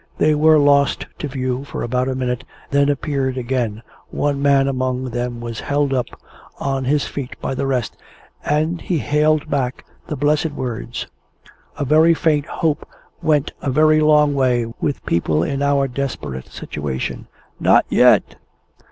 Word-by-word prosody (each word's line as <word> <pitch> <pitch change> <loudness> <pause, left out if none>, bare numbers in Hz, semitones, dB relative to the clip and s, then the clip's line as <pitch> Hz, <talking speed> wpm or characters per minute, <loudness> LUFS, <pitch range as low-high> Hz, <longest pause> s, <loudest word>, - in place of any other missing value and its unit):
They 155 - +3
were 155 +1 +5
lost 140 -1 +3
to 150 - -3
view 130 -1 -3
for 145 - -5
about 125 +2 0
a 130 - -2
minute; 125 -1 -2 0.3
then 140 0 +3
appeared 135 -2 -1
again 120 -3 -2 0.3
one 145 -1 -1
man 140 -1 +4
among 130 -1 -2
them 120 0 -3
was 115 -1 -5
held 145 -1 0
up 125 -2 0 0.5
on 135 -1 -1
his 145 +2 +1
feet 135 -3 -6
by - - -3
the 135 +1 -2
rest, 125 -4 -1 0.5
and 155 +3 0
he 175 - -1
hailed 150 +1 +1
back 135 -4 -2 0.2
the 155 - -3
blessed 150 +2 +1
words 120 -3 -4 0.7
(a 145 - -1
very 160 +4 +5
faint 150 -4 +1
hope 155 -2 -2 0.3
went 150 -2 +1
a - - -2
very 155 +3 +4
long 150 -1 +4
way 125 -4 +2 0.2
with 145 - -2
people 80 -2 +1
in 140 0 -2
our 140 -1 +2
desperate 120 - -4
situation): 70 -3 -5 0.3
"Not - - +4
yet!" - - +4
140 Hz, 155 wpm, -20 LUFS, 125-150 Hz, 0.7 s, were